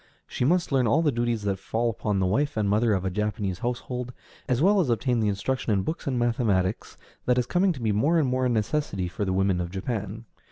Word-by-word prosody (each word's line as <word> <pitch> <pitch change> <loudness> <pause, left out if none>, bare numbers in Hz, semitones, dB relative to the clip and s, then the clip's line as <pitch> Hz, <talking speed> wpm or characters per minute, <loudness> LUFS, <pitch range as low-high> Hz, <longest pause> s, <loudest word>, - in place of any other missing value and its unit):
She - - -3
must 175 +3 +2
learn 130 -3 +3
all 145 +9 +3
the 150 - +3
duties 120 -3 -1
that 100 -2 -1
fall 110 +4 -1
upon 105 -2 -1
the 95 - +1
wife 140 +8 0
and 105 -2 +1
mother 110 +2 +2
of 95 0 -2
a 95 - -1
Japanese 105 -2 -2
household, 125 +1 -3 0.4
as 125 -1 +2
well 200 +6 +4
as 165 -9 +1
obtain 120 +1 +1
the 110 - +1
instruction 110 +5 -1
in 100 -2 +2
books 160 - -4
and 130 -2 0
mathematics 115 -5 0 0.3
that 125 0 +3
is 125 - +2
coming 180 +8 +2
to 135 -7 -6
be 110 - +2
more 140 +12 +2
and 155 -4 +2
more 130 0 +1
a - - 0
necessity 110 -4 -1
for 90 +4 -3
the 95 - -1
women 95 -1 +1
of 85 - -4
Japan. 105 +3 -4
115 Hz, 240 wpm, -26 LUFS, 100-130 Hz, 0.4 s, well